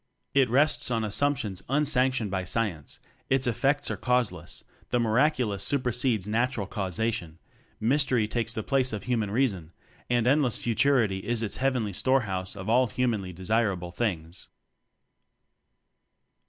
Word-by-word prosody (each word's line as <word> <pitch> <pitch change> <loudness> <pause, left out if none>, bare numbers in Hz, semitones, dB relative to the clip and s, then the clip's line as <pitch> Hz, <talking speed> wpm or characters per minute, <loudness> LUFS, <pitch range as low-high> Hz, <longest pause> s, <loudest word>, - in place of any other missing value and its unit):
It 135 -3 +4
rests 140 +4 +2
on 115 -2 0
assumptions 110 -3 -1
un 150 +3 +2
sanctioned 130 -6 +1
by 95 -1 -1
science; 90 -5 -2 0.3
its 135 -1 +2
effects 135 +5 +1
are - - -3
causeless; 115 -9 -1 0.3
the 125 - +1
miraculous 120 -3 +1
supersedes 125 -6 +1
natural 115 0 0
causation; 95 -3 -3 0.4
mystery 125 -2 +2
takes 115 +1 -2
the 110 -1 -3
place 130 -3 +1
of 105 - -4
human 115 -4 -1
reason; 100 -8 -1 0.4
and 120 -2 +2
endless 135 -2 +3
futurity 115 -4 +2
is 115 +3 -1
its 105 - -4
heavenly 125 -6 0
storehouse 100 -6 0
of 95 0 -7
all 125 +3 +4
humanly 110 -5 -1
desirable 95 -1 -1
things. 85 -4 -3
115 Hz, 130 wpm, -27 LUFS, 100-130 Hz, 0.4 s, It